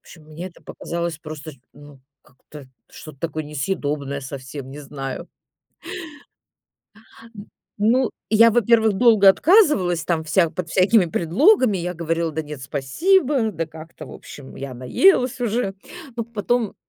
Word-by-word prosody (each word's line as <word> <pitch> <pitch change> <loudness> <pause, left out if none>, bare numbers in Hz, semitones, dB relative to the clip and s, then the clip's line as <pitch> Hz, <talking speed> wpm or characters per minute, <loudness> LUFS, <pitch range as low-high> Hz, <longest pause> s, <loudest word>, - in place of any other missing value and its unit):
общем, 160 -3 -16
мне 155 +4 -8
это 170 - -21
показалось 170 -2 -5
просто, 155 0 -9 0.2
ну, 145 -2 -15 0.2
как-то 140 +2 -15 0.3
что-то 155 -4 -12
такое 155 -1 -4
несъедобное 145 -2 -3
совсем, 135 0 -8
не 145 - -9
знаю. 135 -2 -7 2.1
М. 205 0 -11 0.3
Ну, 235 +4 +2 0.2
я, 230 +1 +6
во-первых, 225 -1 +3
долго 215 -2 +5
отказывалась 195 - +4
там 160 -1 -1
вся 170 +2 +2
под 180 -1 -5
всякими 195 +3 +4
предлогами. 210 - +3
Я 180 0 -3
говорила: 165 -1 -2
"Да 160 +1 -3
нет, 150 -3 -9
спасибо, 260 - +1
да 165 -1 -3
как-то, 160 +1 -12
в - - -11
общем, 140 -2 -12
я 135 -1 -6
наелась 250 - +2
уже". 225 -4 -1 0.4
Но 230 - -2
потом, 235 0 -2
170 Hz, 135 wpm, -21 LUFS, 150-220 Hz, 2.1 s, я